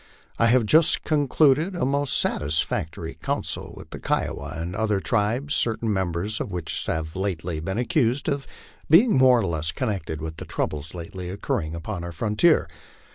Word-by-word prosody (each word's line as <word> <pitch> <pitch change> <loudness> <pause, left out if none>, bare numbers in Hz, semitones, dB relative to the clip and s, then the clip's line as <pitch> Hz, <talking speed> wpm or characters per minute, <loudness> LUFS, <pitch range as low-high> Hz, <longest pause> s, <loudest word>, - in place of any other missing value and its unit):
I 115 - +5
have 120 0 +4
just 155 +9 +5
concluded 150 +3 +2
a 175 - 0
most 140 0 0
satisfactory 80 +1 -1
council - - -3
with - - -12
the - - -7
Kiowa 70 - -2
and 85 +3 -4
other 105 -2 +1
tribes, 115 +7 0
certain 115 -1 +1
members 95 +2 -1
of - - -4
which 85 -4 -2
have 80 0 -3
lately 90 -4 -3
been 95 +6 -3
accused 125 +1 +1
of 140 -3 -1 0.4
being 205 +9 +6
more 130 -1 +6
or 115 - 0
less 80 -2 -1
connected 95 - -3
with 80 0 -6
the - - -7
troubles 75 +3 -3
lately 90 +1 -7
occurring 85 -4 -3
upon 85 +2 -5
our 85 - -5
frontier. 105 - +2
100 Hz, 165 wpm, -24 LUFS, 85-130 Hz, 0.4 s, being